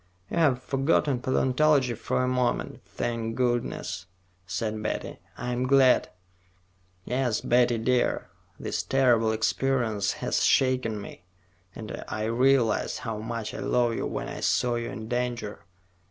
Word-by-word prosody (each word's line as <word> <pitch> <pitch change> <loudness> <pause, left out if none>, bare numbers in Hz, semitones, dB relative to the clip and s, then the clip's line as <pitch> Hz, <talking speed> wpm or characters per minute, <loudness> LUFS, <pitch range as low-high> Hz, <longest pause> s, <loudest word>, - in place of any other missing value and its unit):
"You've 140 -7 +2
forgotten 135 -1 +1
paleontology 130 0 +2
for 120 +2 -1
a - - +1
moment, 125 -1 -1
thank 115 -1 -3
goodness," 120 -6 -1 0.4
said 110 +2 -3
Betty. - - -4 0.2
"I'm 125 +1 -2
glad." 135 -1 +5 1.0
"Yes, 125 -3 0
Betty 120 -1 +3
dear. 125 +2 0 0.3
This - - -2
terrible 120 -4 +3
experience 110 -2 0
has - - -1
shaken 130 -5 +2
me, 100 - -10 0.5
and 110 -2 -7
I 110 - -3
realized 120 +1 +2
how 115 -3 -4
much 115 0 -4
I - - -6
love 120 -1 +1
you - - -2
when - - -4
I - - -6
saw 125 -1 +1
you 120 0 -2
in 110 -1 -7
danger. 120 -5 -3
120 Hz, 130 wpm, -27 LUFS, 115-130 Hz, 1.0 s, glad